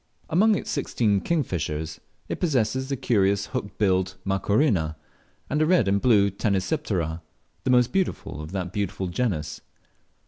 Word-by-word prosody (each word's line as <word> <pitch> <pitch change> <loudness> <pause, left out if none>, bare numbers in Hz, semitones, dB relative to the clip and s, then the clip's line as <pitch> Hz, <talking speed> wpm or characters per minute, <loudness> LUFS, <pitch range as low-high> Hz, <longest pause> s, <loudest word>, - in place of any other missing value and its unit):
Among 210 +6 +4
its - - -4
sixteen 110 -7 +1
kingfishers, 80 - -2 0.3
it - - -4
possesses 130 -4 0
the 135 - -1
carious 100 -6 +2
hook 100 -1 -4
billed 95 -2 +1
Macrorhina, 95 - +1 0.5
and 150 +2 0
a 155 - +3
red 170 - +4
and 100 +1 +2
blue 100 -5 +4
Tanysiptera, 95 - -1 0.4
the - - +1
most 125 -1 +4
beautiful 185 - -2
of 75 +2 -8
that 95 -2 -4
beautiful 95 -2 -2
genus. 85 -8 -2
100 Hz, 140 wpm, -25 LUFS, 95-130 Hz, 0.5 s, Among